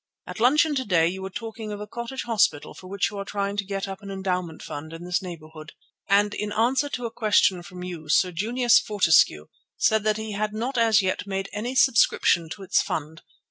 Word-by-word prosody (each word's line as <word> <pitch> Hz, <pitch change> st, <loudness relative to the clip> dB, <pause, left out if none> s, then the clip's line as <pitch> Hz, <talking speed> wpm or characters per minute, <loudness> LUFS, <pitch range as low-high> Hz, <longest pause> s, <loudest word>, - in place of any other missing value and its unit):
At -, -, -8 dB
luncheon 295 Hz, +6 st, +4 dB
to 265 Hz, -2 st, -1 dB
day 170 Hz, -7 st, +3 dB
you 190 Hz, +2 st, -4 dB
were 190 Hz, -, -5 dB
talking 220 Hz, +1 st, -7 dB
of 205 Hz, -, -5 dB
a 210 Hz, -, -5 dB
Cottage 235 Hz, +4 st, -6 dB
Hospital 210 Hz, -10 st, +1 dB
for 185 Hz, -, -12 dB
which 200 Hz, +3 st, -1 dB
you 205 Hz, -, -6 dB
are -, -, -3 dB
trying 200 Hz, 0 st, -3 dB
to 200 Hz, -, 0 dB
get 195 Hz, 0 st, -4 dB
up 195 Hz, +2 st, -7 dB
an 200 Hz, -, -9 dB
endowment 180 Hz, -4 st, -3 dB
fund 155 Hz, +2 st, -7 dB
in 165 Hz, +1 st, -8 dB
this 180 Hz, 0 st, 0 dB
neighbourhood, 155 Hz, -3 st, -10 dB, 0.4 s
and 205 Hz, +1 st, +3 dB
in 210 Hz, 0 st, -4 dB
answer 250 Hz, +6 st, +1 dB
to 245 Hz, -3 st, -4 dB
a 230 Hz, -, -4 dB
question 205 Hz, -5 st, +2 dB
from 180 Hz, 0 st, -10 dB
you 170 Hz, -4 st, -7 dB
Sir 180 Hz, +4 st, +3 dB
Junius 235 Hz, +7 st, +3 dB
Fortescue 165 Hz, -, +3 dB, 0.3 s
said 220 Hz, -1 st, +2 dB
that 215 Hz, 0 st, +1 dB
he 220 Hz, 0 st, -5 dB
had 210 Hz, +1 st, -2 dB
not 245 Hz, +5 st, -3 dB
as 225 Hz, -3 st, +4 dB
yet 190 Hz, +1 st, -2 dB
made 195 Hz, 0 st, -3 dB
any 235 Hz, +5 st, -4 dB
subscription 215 Hz, -, +3 dB
to 195 Hz, +4 st, -8 dB
its 190 Hz, -, +2 dB
fund. 160 Hz, +1 st, -5 dB
200 Hz, 220 wpm, -25 LUFS, 180-220 Hz, 0.4 s, luncheon